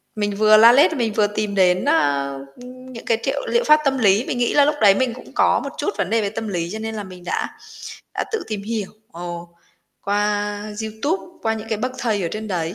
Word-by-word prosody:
mình 205 -1 -2
vừa 215 +1 +6
la 230 +2 +8
lết 285 +6 +5
mình 235 -7 -1
vừa 210 0 +2
tìm 210 0 -3
đến, 185 +1 +3
ờ, 140 - +1 0.3
ừm, 255 +1 -12
những 230 - -10
cái 230 - +2
triệu - - -1
liệu 475 0 +1
pháp 305 -5 +5
tâm 270 -1 +2
lý. 210 +1 +3
Mình - - -3
nghĩ 240 -1 +1
là 285 - +5
lúc 295 +1 +1
đấy 200 -2 +6
mình 255 0 0
cũng 255 - -13
có - - +3
một - - -4
chút - - -1
vấn 180 - -1
đề 225 +1 +2
về 205 - -1
tâm 220 +1 -5
lý 175 -4 -3
cho 220 - -5
nên 220 0 -5
là 210 - -4
mình 185 -2 -12
đã 175 - -2 0.7
đã - - -1
tự 445 -2 -2
tìm 210 -2 -4
hiểu, 215 -2 -4 0.2
ồ, 175 0 -7 0.5
qua 205 0 -1 0.2
YouTube, 285 - -3
qua 225 0 0
những 220 0 -8
cái 220 -2 -2
bậc 255 +3 -2
thầy 215 -5 -1
ở 170 - -1
trên 215 0 -5
đấy 170 -2 -2
215 Hz, 245 wpm, -21 LUFS, 200-240 Hz, 0.7 s, la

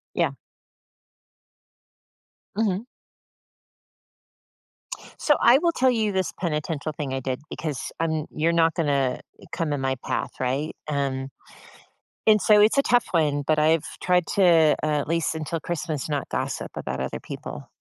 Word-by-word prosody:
Yeah. - - +2 2.2
Mhm. 210 +1 0 2.3
So 295 - +4
I 240 +2 +7
will 340 +3 +2
tell 260 -5 +3
you 220 -4 +1
this 190 -1 -1
penitential 155 -2 -2
thing 145 -3 -4
I 135 - -1
did 130 -1 -3
because 150 -5 -4
I'm 160 -2 0
you're 165 +2 +1
not 165 -1 +3
gonna 140 -6 +1 0.3
come 155 -3 -1
in 140 - -2
my 130 0 0
path, - - -2
right 130 +4 -1
And 135 -2 -1 1.0
and 215 -2 +5
so, 210 -1 +6
it's 215 +5 +4
a - - +6
tough 245 -4 +3
one, 150 -4 +1
but 155 +1 +2
I've 155 +1 +3 0.2
tried 180 -2 +2
to 170 -5 +5
uh, - - -1
at 150 -1 0
least 165 -1 0
until 160 +1 -3
Christmas, 155 -3 -3
not 145 -3 -3
gossip - - -3
about 65 0 -4
other 65 - -3
people. - - -8
160 Hz, 145 wpm, -25 LUFS, 145-185 Hz, 2.3 s, I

